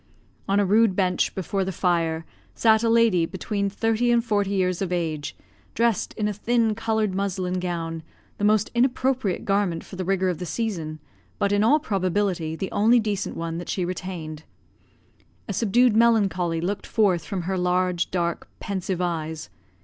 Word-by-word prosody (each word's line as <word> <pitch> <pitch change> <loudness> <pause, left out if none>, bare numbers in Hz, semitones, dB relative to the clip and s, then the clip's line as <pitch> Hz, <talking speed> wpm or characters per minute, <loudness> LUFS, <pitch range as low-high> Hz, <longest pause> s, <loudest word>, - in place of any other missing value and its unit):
On 200 +1 +3
a 205 - +3
rude 210 0 +4
bench, 185 -2 +1
before 190 +1 -1
the 190 - -3
fire, 165 -3 0 0.3
sat 220 -1 +4
a 230 - +2
lady, 225 -7 +4
between 200 +2 -2
thirty 225 +3 +1
and 235 0 +2
forty 205 -3 +1
years 185 -2 0
of 190 -2 -2
age, 160 -4 -2 0.4
dressed 230 -3 +1
in 210 -2 -1
a 210 - -1
thin, 225 +2 +1
coloured 220 -2 -1
muslin 185 -2 -1
gown, 165 -2 -3 0.4
the - - -3
most 210 0 +3
inappropriate 255 -4 +1
garment 195 -4 0
for 190 - -11
the 185 - -2
rigour 190 0 +1
of 175 - -3
the 180 - -4
season, 170 -6 -3 0.4
but, 200 - +1
in 205 +1 +3
all 245 +7 +5
probability, 185 - -1
the 190 +3 -4
only 230 +4 +4
decent 205 -3 -2
one 165 0 -3
that 175 - -8
she 185 - -1
retained. 175 -4 -5 1.1
A 205 - -3
subdued 230 +3 +3
melancholy 195 -8 +2
looked 195 +4 -3
forth 190 -7 +2
from 185 +3 -4
her 190 +2 -2
large, 180 -1 +1
dark, 170 -2 -2
pensive 190 -3 -3
eyes. 160 - -3
190 Hz, 170 wpm, -24 LUFS, 175-215 Hz, 1.1 s, all